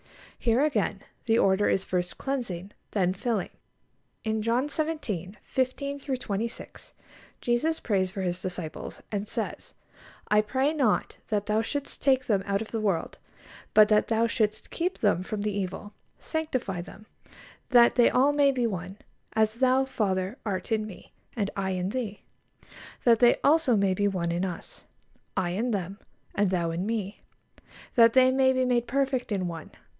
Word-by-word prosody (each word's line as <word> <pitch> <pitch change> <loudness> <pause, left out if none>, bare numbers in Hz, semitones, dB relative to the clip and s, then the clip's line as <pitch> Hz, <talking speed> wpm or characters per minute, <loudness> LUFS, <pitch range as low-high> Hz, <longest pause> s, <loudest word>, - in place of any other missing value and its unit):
Here 240 +3 +2
again, 305 - -1 0.2
the 225 0 +4
order 195 -1 +3
is 190 - +1
first 180 -1 -2
cleansing, 205 -9 -3 0.2
then 185 -3 +1
filling. 210 0 -2 0.7
In 220 -1 -1
John 235 +5 +1
xvii. 275 - -3
15 280 +2 -2
26, 235 -5 -5 0.5
Jesus 245 +7 +1
prays 190 -3 0
for 190 0 -4
His 180 0 -2
disciples, 180 -4 -6
and 205 0 -2
says: - - -5 0.5
"I 210 0 +5
pray 265 +7 0
not 265 -9 +1
that 205 -2 -1
Thou 215 +1 +1
shouldst 280 +5 -4
take 260 -2 +3
them 200 -4 +2
out 200 +2 0
of 220 - -12
the 225 - -1
world, 195 -6 -1 0.6
but 215 0 +8
that 210 -1 +4
Thou 225 0 +2
shouldst 215 -2 -1
keep 360 +2 -1
them 205 -5 +2
from 205 +2 -4
the 210 -1 -1
evil.... 200 +1 -4 0.2
Sanctify 255 - -3
them;... 200 +4 -12 0.6
that 240 -2 +6
they 240 - +5
all 270 +3 +4
may 285 -1 +4
be 250 -3 0
one; 190 -2 -4 0.4
as 220 0 +2
Thou, 260 +1 +3
Father, 195 -3 -1
art 190 -3 -3
in 215 -1 +1
Me, 200 - -12 0.2
and 205 -4 -1
I 195 -1 -1
in 185 0 -1
Thee; 215 -3 -4 0.8
that 230 -2 +5
they 240 0 +6
also 290 -4 +4
may 195 -1 +2
be 205 +2 +1
one 175 -4 -1
in 175 +2 -1
Us;... 180 -3 -7 0.5
I 180 -2 +1
in 220 +7 -1
them, 195 -2 -3 0.3
and 205 -1 +2
Thou 170 -3 0
in 175 +4 -2
Me, 210 -3 -3 0.7
that 230 -1 +6
they 260 0 +6
may 260 0 +4
be 255 0 +1
made 240 -1 +1
perfect 270 -2 0
in 190 -3 0
one 165 -2 -7
215 Hz, 165 wpm, -27 LUFS, 190-255 Hz, 0.8 s, but